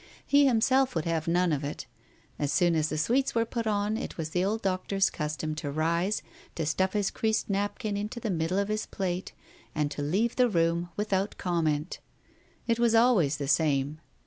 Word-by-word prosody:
He 285 Hz, 0 st, +5 dB
himself 260 Hz, +1 st, +3 dB
would 160 Hz, -, -1 dB
have 165 Hz, -1 st, -1 dB
none 175 Hz, +1 st, +2 dB
of 145 Hz, -1 st, -1 dB
it. 145 Hz, -, -5 dB, 0.5 s
As 145 Hz, -1 st, 0 dB
soon 175 Hz, -1 st, +3 dB
as 155 Hz, -1 st, +1 dB
the 155 Hz, -, -2 dB
sweets 245 Hz, -, +1 dB
were 230 Hz, 0 st, +2 dB
put 230 Hz, -1 st, -3 dB
on, 210 Hz, +1 st, 0 dB
it -, -, -6 dB
was 160 Hz, -2 st, -4 dB
the 180 Hz, +2 st, +1 dB
old 215 Hz, +3 st, -1 dB
Doctor's 195 Hz, +1 st, +1 dB
custom 150 Hz, 0 st, -3 dB
to 155 Hz, -1 st, -4 dB
rise, 170 Hz, +7 st, 0 dB, 0.3 s
to 165 Hz, -, -2 dB
stuff 185 Hz, +5 st, 0 dB
his 205 Hz, -2 st, 0 dB
creased 220 Hz, -2 st, 0 dB
napkin 205 Hz, +2 st, -2 dB
into 210 Hz, +4 st, -4 dB
the 220 Hz, -3 st, -2 dB
middle 165 Hz, +2 st, -1 dB
of 200 Hz, +1 st, 0 dB
his 215 Hz, 0 st, -2 dB
plate, 185 Hz, -1 st, -3 dB, 0.4 s
and 150 Hz, -1 st, 0 dB
to 145 Hz, -, -4 dB
leave 195 Hz, +11 st, 0 dB
the 250 Hz, -1 st, +4 dB
room 170 Hz, -2 st, +1 dB
without 205 Hz, -1 st, -1 dB
comment. 165 Hz, -3 st, -1 dB, 0.7 s
It 230 Hz, 0 st, +1 dB
was 235 Hz, -1 st, +3 dB
always 215 Hz, -, +4 dB
the 140 Hz, -1 st, -4 dB
same. 150 Hz, -1 st, +1 dB
185 Hz, 195 wpm, -28 LUFS, 155-215 Hz, 0.7 s, He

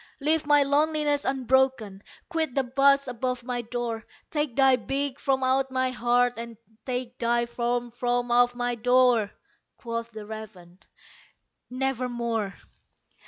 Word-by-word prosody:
Leave 305 Hz, +1 st, +1 dB
my 290 Hz, -1 st, +5 dB
loneliness 295 Hz, 0 st, +1 dB
unbroken! 260 Hz, -6 st, +1 dB, 0.3 s
quit 320 Hz, -6 st, -2 dB
the 275 Hz, -, +2 dB
bust 275 Hz, +2 st, +3 dB
above 250 Hz, 0 st, -3 dB
my 245 Hz, 0 st, -3 dB
door! 235 Hz, -1 st, -4 dB, 0.3 s
Take 295 Hz, -5 st, -1 dB
thy 270 Hz, -1 st, +5 dB
beak 275 Hz, +2 st, -3 dB
from 265 Hz, -2 st, 0 dB
out 265 Hz, +1 st, +2 dB
my 260 Hz, 0 st, 0 dB
heart, 245 Hz, 0 st, +2 dB
and 230 Hz, -1 st, -7 dB, 0.3 s
take 250 Hz, -1 st, -4 dB
thy 235 Hz, 0 st, +1 dB
form 240 Hz, 0 st, -2 dB
from 245 Hz, 0 st, -1 dB
off 245 Hz, 0 st, +4 dB
my 245 Hz, 0 st, -1 dB
door!" 245 Hz, -2 st, +3 dB, 0.5 s
Quoth 230 Hz, -1 st, -4 dB
the 220 Hz, -2 st, -9 dB
raven, 205 Hz, -5 st, -10 dB, 0.9 s
"Nevermore." 240 Hz, -5 st, -2 dB
245 Hz, 130 wpm, -26 LUFS, 235-270 Hz, 0.9 s, my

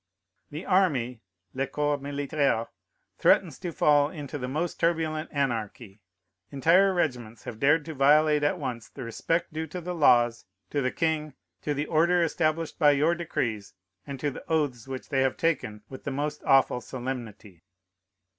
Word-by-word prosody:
The 155 Hz, +4 st, -7 dB
army 135 Hz, -, +1 dB, 0.3 s
[le 135 Hz, +1 st, -1 dB
corps 145 Hz, +1 st, -1 dB
militaire] 140 Hz, -4 st, -1 dB, 0.5 s
threatens -, -, +3 dB
to 175 Hz, -2 st, -4 dB
fall 145 Hz, -2 st, +3 dB
into 145 Hz, -3 st, -7 dB
the 125 Hz, -, -4 dB
most 155 Hz, +6 st, -3 dB
turbulent 160 Hz, -2 st, 0 dB
anarchy. 115 Hz, -6 st, -3 dB, 0.5 s
Entire 170 Hz, +8 st, +4 dB
regiments 125 Hz, -11 st, -2 dB
have 110 Hz, -, -8 dB
dared 150 Hz, +4 st, +3 dB
to 160 Hz, -, -6 dB
violate 150 Hz, +2 st, +4 dB
at 145 Hz, +5 st, +1 dB
once 125 Hz, -7 st, -5 dB
the 135 Hz, -, -9 dB
respect 160 Hz, +9 st, -2 dB
due 160 Hz, +1 st, -3 dB
to 180 Hz, +4 st, -6 dB
the 180 Hz, +1 st, -5 dB
laws, 120 Hz, -7 st, +3 dB, 0.3 s
to 145 Hz, -, 0 dB
the 130 Hz, -, +1 dB
king, 155 Hz, -3 st, -1 dB, 0.3 s
to 150 Hz, -, -2 dB
the 145 Hz, +2 st, -1 dB
order 170 Hz, +3 st, +3 dB
established 160 Hz, 0 st, -1 dB
by 150 Hz, -3 st, +6 dB
your 145 Hz, +4 st, +3 dB
decrees, 120 Hz, -, -3 dB, 0.3 s
and 140 Hz, -2 st, -6 dB
to 145 Hz, +1 st, -1 dB
the -, -, -9 dB
oaths 140 Hz, -7 st, 0 dB
which 130 Hz, -1 st, -7 dB
they 135 Hz, -1 st, +1 dB
have 130 Hz, -1 st, +1 dB
taken 130 Hz, -10 st, -1 dB
with 130 Hz, -, -10 dB
the -, -, -3 dB
most 145 Hz, +2 st, -3 dB
awful 135 Hz, -2 st, +4 dB
solemnity. 120 Hz, -9 st, -7 dB
145 Hz, 165 wpm, -27 LUFS, 125-160 Hz, 0.5 s, by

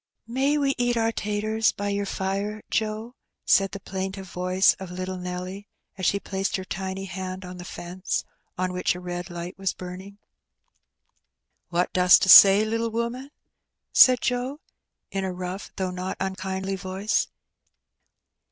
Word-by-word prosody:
"May 265 Hz, +5 st, +1 dB
we 280 Hz, -2 st, +2 dB
eat 245 Hz, -1 st, +1 dB
our 225 Hz, 0 st, +2 dB
taters 215 Hz, +1 st, 0 dB
by 205 Hz, 0 st, -4 dB
your 200 Hz, 0 st, -1 dB
fire, 200 Hz, +3 st, -3 dB
Joe?" 220 Hz, +2 st, -2 dB, 0.3 s
said 195 Hz, 0 st, +4 dB
the 200 Hz, -, -7 dB
plaintive 190 Hz, 0 st, -5 dB
voice 185 Hz, +1 st, +3 dB
of 190 Hz, -2 st, -7 dB
little 185 Hz, +1 st, -5 dB
Nelly, 180 Hz, +3 st, -6 dB, 0.3 s
as 185 Hz, -2 st, -1 dB
she 200 Hz, -, +2 dB
placed 195 Hz, 0 st, -2 dB
her 190 Hz, -, -3 dB
tiny 190 Hz, +1 st, -4 dB
hand 185 Hz, 0 st, -6 dB
on 180 Hz, 0 st, -8 dB
the 180 Hz, -, -8 dB
fence, 180 Hz, +1 st, -4 dB, 0.3 s
on 185 Hz, 0 st, -1 dB
which 180 Hz, 0 st, 0 dB
a -, -, -6 dB
red 175 Hz, -1 st, -5 dB
light 175 Hz, +2 st, -7 dB
was 195 Hz, -1 st, 0 dB
burning. 185 Hz, +2 st, -9 dB, 1.5 s
''What 175 Hz, +1 st, 0 dB
dost 180 Hz, 0 st, +6 dB
'a -, -, -1 dB
say, 200 Hz, +2 st, +10 dB
little 230 Hz, +1 st, -1 dB
woman?" 235 Hz, +4 st, -3 dB, 0.6 s
said 255 Hz, -2 st, +7 dB
Joe, 250 Hz, +4 st, -1 dB, 0.5 s
in 195 Hz, 0 st, -2 dB
a 190 Hz, -, -2 dB
rough 180 Hz, +2 st, -6 dB
though 190 Hz, -2 st, -2 dB
not 180 Hz, +1 st, -4 dB
unkindly 190 Hz, 0 st, -3 dB
voice. 190 Hz, +3 st, -1 dB
190 Hz, 150 wpm, -25 LUFS, 185-215 Hz, 1.5 s, say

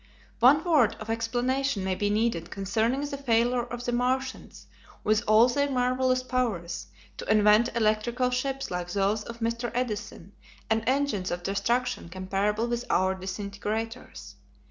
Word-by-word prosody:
One 275 Hz, +6 st, +6 dB
word 330 Hz, -4 st, +3 dB
of 220 Hz, +1 st, -5 dB
explanation 245 Hz, +1 st, -1 dB
may 190 Hz, 0 st, 0 dB
be 205 Hz, +2 st, -1 dB
needed 210 Hz, -6 st, 0 dB
concerning 220 Hz, +7 st, 0 dB
the 285 Hz, -1 st, -4 dB
failure 240 Hz, -1 st, +2 dB
of 240 Hz, 0 st, -6 dB
the 245 Hz, -, 0 dB
Martians, 260 Hz, +2 st, -2 dB, 0.4 s
with 215 Hz, +1 st, +2 dB
all 215 Hz, +3 st, +6 dB
their 285 Hz, +3 st, 0 dB
marvellous 255 Hz, 0 st, +1 dB
powers, 215 Hz, -10 st, -2 dB, 0.3 s
to -, -, -3 dB
invent 215 Hz, +2 st, +5 dB
electrical 235 Hz, +3 st, +1 dB
ships 270 Hz, 0 st, -2 dB
like 175 Hz, 0 st, -3 dB
those 200 Hz, +3 st, +1 dB
of 235 Hz, +1 st, -9 dB
Mr. 235 Hz, +1 st, -1 dB
Edison 210 Hz, -6 st, -4 dB, 0.4 s
and 220 Hz, 0 st, +2 dB
engines 260 Hz, -8 st, 0 dB
of 175 Hz, 0 st, -4 dB
destruction 235 Hz, +2 st, -1 dB
comparable 195 Hz, +4 st, -1 dB
with 240 Hz, 0 st, -2 dB
our 190 Hz, +1 st, +2 dB
disintegrators. 205 Hz, +5 st, -5 dB
230 Hz, 145 wpm, -27 LUFS, 205-250 Hz, 0.4 s, One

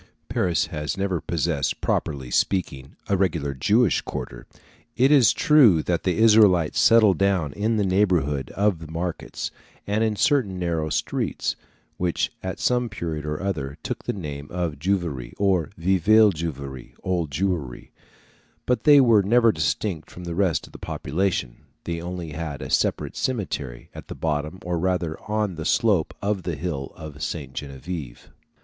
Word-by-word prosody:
Paris 90 Hz, -3 st, +1 dB
has 75 Hz, +4 st, -3 dB
never 95 Hz, -3 st, -1 dB
possessed, 80 Hz, -3 st, -1 dB
properly 65 Hz, -5 st, -2 dB
speaking, 70 Hz, -8 st, -1 dB
a 100 Hz, -, +2 dB
regular 85 Hz, -7 st, 0 dB
Jewish 105 Hz, -, +2 dB
quarter; -, -, -7 dB, 0.5 s
it 130 Hz, +3 st, +4 dB
is 130 Hz, -7 st, +6 dB
true 120 Hz, -, +5 dB
that 85 Hz, -2 st, 0 dB
the 90 Hz, -2 st, +1 dB
Israelites 105 Hz, -7 st, +5 dB
settled 110 Hz, -6 st, +5 dB
down 95 Hz, -8 st, +1 dB
in 110 Hz, +2 st, 0 dB
the 105 Hz, -, +1 dB
neighbourhood 90 Hz, -8 st, +1 dB
of 100 Hz, -4 st, +1 dB
the 80 Hz, -1 st, -10 dB
markets, 85 Hz, +1 st, -4 dB, 0.3 s
and 105 Hz, +2 st, 0 dB
in 110 Hz, -1 st, +1 dB
certain 105 Hz, -3 st, +2 dB
narrow 85 Hz, -3 st, -1 dB
streets, -, -, -1 dB, 0.4 s
which 90 Hz, -2 st, 0 dB
at 95 Hz, 0 st, -5 dB
some 125 Hz, -1 st, +1 dB
period 80 Hz, -7 st, -4 dB
or 75 Hz, +4 st, -3 dB
other 75 Hz, -8 st, -3 dB
took -, -, -5 dB
the -, -, 0 dB
name 75 Hz, -6 st, -6 dB
of 85 Hz, -5 st, -3 dB
Juiverie 85 Hz, -8 st, -2 dB
or 95 Hz, -3 st, +1 dB
Vieille 95 Hz, +5 st, +4 dB
Juiverie 70 Hz, -6 st, -6 dB
(Old 90 Hz, -4 st, -1 dB
Jewry); 75 Hz, -5 st, -3 dB, 0.7 s
but 125 Hz, -, 0 dB
they 145 Hz, -2 st, +8 dB
were 115 Hz, -6 st, +6 dB
never 115 Hz, +3 st, +4 dB
distinct 95 Hz, -6 st, -2 dB
from 90 Hz, -, -10 dB
the 85 Hz, -1 st, -4 dB
rest 90 Hz, -2 st, +1 dB
of -, -, -18 dB
the -, -, -10 dB
population; 75 Hz, -6 st, -2 dB, 0.3 s
they 85 Hz, -1 st, -4 dB
only 90 Hz, -2 st, -5 dB
had 75 Hz, -2 st, -5 dB
a -, -, -7 dB
separate -, -, 0 dB
cemetery, 80 Hz, -, -3 dB
at -, -, -10 dB
the -, -, -7 dB
bottom 75 Hz, +2 st, -2 dB
or 90 Hz, -1 st, -1 dB
rather 90 Hz, -3 st, -1 dB
on 105 Hz, -2 st, 0 dB
the 80 Hz, -1 st, -6 dB
slope 100 Hz, -2 st, +2 dB
of 100 Hz, -1 st, 0 dB
the 85 Hz, -2 st, -3 dB
hill 70 Hz, -3 st, -4 dB
of 75 Hz, -2 st, -9 dB
Sainte 75 Hz, -5 st, -4 dB
Geneviève. 70 Hz, -1 st, -7 dB
90 Hz, 160 wpm, -24 LUFS, 75-100 Hz, 0.7 s, they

